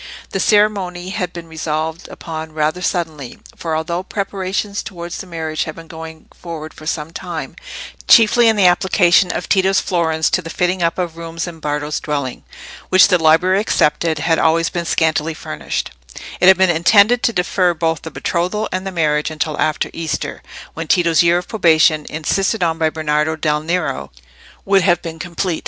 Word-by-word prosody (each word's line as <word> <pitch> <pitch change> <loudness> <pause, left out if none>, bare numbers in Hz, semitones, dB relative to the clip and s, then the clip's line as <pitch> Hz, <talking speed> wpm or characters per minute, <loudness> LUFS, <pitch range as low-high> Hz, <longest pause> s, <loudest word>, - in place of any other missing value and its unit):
The - - -2
ceremony 195 -4 +1
had 190 -3 -3
been 170 -2 -9
resolved 160 +1 -4
upon 160 -1 -7
rather 155 +3 -1
suddenly; 160 -8 -3 0.2
for 165 -2 -3
although 170 +3 -2
preparations 195 +1 -3
towards 175 -4 -7
the 190 - -8
marriage 160 -2 -3
had 155 - -7
been 165 - -11
going 160 -1 -10
forward 160 -2 -8
for 155 - -11
some 160 -1 -3
time—chiefly 225 - +1
in 225 - +4
the 200 -3 +3
application 180 0 +4
of - - -4
Tito's 195 0 +3
florins 160 -3 0
to - - +1
the 165 - -8
fitting 180 +2 -1
up 165 -1 0
of 175 -3 -3
rooms 165 0 -5
in 170 -2 -9
Bardo's 150 0 -2
dwelling, 140 -4 -4 0.5
which, 190 +1 +6
the 180 -3 +3
library 180 +5 +4
excepted, 160 -5 +1
had 165 +2 +1
always 165 +1 +2
been 175 -1 -3
scantily 160 -1 0
furnished—it - - -4
had 190 -1 +8
been 190 -1 +4
intended 200 +8 +4
to - - +2
defer 180 -2 +1
both 165 -1 -1
the 160 - -7
betrothal 180 +6 -2
and 185 +1 -3
the - - -3
marriage 150 -4 0
until 155 -1 -3
after 155 - 0
Easter, 165 -1 -4 0.3
when 165 0 -6
Tito's 170 -3 +3
year 170 0 +4
of 180 - -4
probation, 160 -6 +3
insisted 190 +6 -1
on 165 -1 0
by 160 -1 +2
Bernardo 155 0 -1
del 150 -1 0
Nero, 160 - -2 0.5
would 195 0 +4
have 175 -2 +2
been 165 -1 -7
complete. 175 0 -3
165 Hz, 175 wpm, -18 LUFS, 160-185 Hz, 0.5 s, had